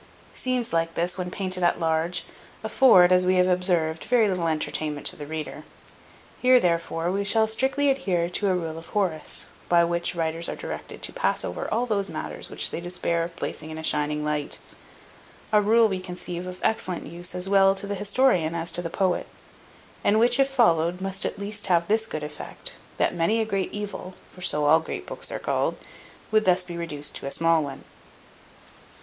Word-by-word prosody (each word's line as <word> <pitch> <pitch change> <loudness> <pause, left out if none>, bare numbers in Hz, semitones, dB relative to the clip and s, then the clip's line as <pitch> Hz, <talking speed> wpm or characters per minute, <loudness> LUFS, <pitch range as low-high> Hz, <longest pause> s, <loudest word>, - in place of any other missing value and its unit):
Scenes 250 -5 -2
like 165 0 0
this, 175 +1 0
when 180 -1 -4
painted 185 -1 -1
at 175 0 +2
large, 165 +1 0 0.4
afford, 185 -9 +6
as 180 0 +5
we 185 +1 +2
have 180 0 +4
observed, 175 -3 +1
very 235 -3 +3
little 180 -4 -1
entertainment 155 -1 -2
to - - +1
the 145 - -8
reader. 155 0 -6 0.8
Here, 255 0 +6
therefore, 170 -2 0
we 200 +1 -1
shall 220 +2 +3
strictly 265 +6 +1
adhere 190 -11 0
to 190 +3 -1
a 185 - +2
rule 165 -2 -4
of 165 - -13
Horace; 180 -7 -1 0.2
by 170 -1 +5
which 170 +1 -1
writers 165 0 -2
are - - -4
directed - - -8
to - - -3
pass - - 0
over - - -5
all 235 +2 +1
those 200 -4 0
matters - - -6
which - - +1
they - - -4
despair 170 -1 -1
of 170 0 -7
placing 155 -2 -4
in 155 - -7
a 160 - -6
shining 150 0 +1
light; 150 -1 -2 0.9
a 210 -1 +5
rule, 225 +2 +4
we 190 -3 -2
conceive, 180 -1 -5
of 180 0 -8
excellent 185 -5 -1
use 175 +3 -2
as 180 +1 0
well 195 0 +5
to 195 - -3
the 200 - -3
historian 200 -5 +2
as 170 0 0
to 175 - +1
the 165 - -4
poet; 185 +1 0 0.8
and 210 - +3
which, 240 +3 +4
if 275 0 +4
followed, 180 -9 +2
must 195 0 +1
at - - -6
least 205 +1 -1
have 170 -2 +3
this 220 +1 +1
good 155 -8 -5
effect, 150 0 -7 0.2
that - - +1
many 175 +7 +1
a 220 - +1
great 195 -3 -2
evil 205 -3 -6 0.2
(for 180 - -14
so 150 -4 +2
all 155 +2 +6
great 160 - -6
books - - -4
are - - -3
called) - - -1 0.5
would 215 0 +3
thus 185 0 +3
be 175 -1 -8
reduced 150 -4 -3
to - - -5
a - - -4
small 165 0 +2
one. 140 -2 -7
180 Hz, 200 wpm, -25 LUFS, 165-205 Hz, 0.9 s, afford